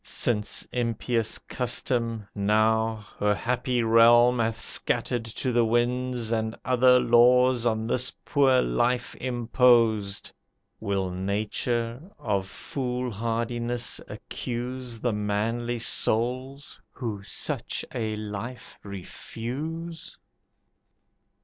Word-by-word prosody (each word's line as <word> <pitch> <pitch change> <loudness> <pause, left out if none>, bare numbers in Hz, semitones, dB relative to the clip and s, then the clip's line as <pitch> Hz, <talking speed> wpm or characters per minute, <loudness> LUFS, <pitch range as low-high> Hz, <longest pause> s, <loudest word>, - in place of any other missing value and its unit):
Since 105 -3 0
impious 115 -1 -1
custom, 120 -3 -2
now, 110 +1 +1
Her 105 0 +2
happy 125 +1 -1
realm 120 +2 +6
hath 115 0 0
scattered 120 -2 +1
to 120 +3 -3
the 120 0 +3
winds, 120 0 0
And 110 -1 -1
other 125 0 +5
laws 125 +1 +5
on 110 -1 0
this 125 +2 0
poor 135 -3 +4
life 120 - 0
imposed, 120 -4 +2 0.5
Will 100 -3 -1
Nature 110 +6 -2 0.2
of 100 -4 -1
fool 125 +2 -4
hardiness 120 +2 -2
accuse 125 0 -5
The 120 0 0
manly 110 +4 -1
souls, 125 +5 -1
who 110 -6 -5
such 100 - -3
a 110 -3 -2
life 105 +4 -7
refuse? 140 - -6
120 Hz, 95 wpm, -26 LUFS, 110-125 Hz, 0.5 s, realm